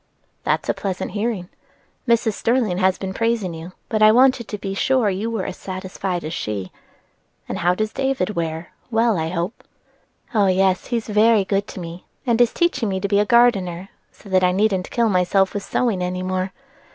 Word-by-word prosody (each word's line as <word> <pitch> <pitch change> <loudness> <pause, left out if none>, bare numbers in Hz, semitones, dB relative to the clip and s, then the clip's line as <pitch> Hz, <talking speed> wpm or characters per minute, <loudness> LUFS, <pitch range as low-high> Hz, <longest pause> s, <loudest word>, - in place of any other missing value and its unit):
"That's - - 0
a - - +2
pleasant 190 -2 -4
hearing. 205 -3 -2 0.6
Mrs. 230 -2 +3
Sterling 225 -5 0
has 190 -1 +3
been 190 -1 -5
praising 230 -5 0
you, 165 +3 -9
but 215 -1 -1
I 215 0 +8
wanted 255 0 +4
to 210 - -5
be 195 -1 -4
sure 235 +1 +2
you 200 +5 -2
were 225 -5 -2
as 190 - -5
satisfied 185 -1 -4
as 155 +2 -4
she. 100 - -4 0.8
And - - -4
how 175 +1 +2
does 215 +2 -2
David 265 -8 0
wear? 165 -2 -4 0.2
well, 225 -1 +2
I 160 0 -1
hope." 175 +6 -4 0.7
"Oh, 205 -3 +3
yes, 185 0 +2
he 240 - 0
is 225 - -4
very 215 -1 +4
good 200 +1 0
to - - -8
me, 170 0 -8 0.2
and 240 -1 +2
is 240 - +4
teaching 265 - 0
me 190 -1 -1
to 200 - -1
be 200 0 +2
a 210 - +3
gardener, 195 -6 +3 0.2
so - - -18
that 185 -1 +3
I 180 - +4
needn't 190 -1 +1
kill 235 -1 +1
myself 190 0 +2
with 205 - -2
sewing 215 -3 0
any 180 0 -2
more. 185 0 -2
195 Hz, 200 wpm, -21 LUFS, 185-225 Hz, 0.8 s, I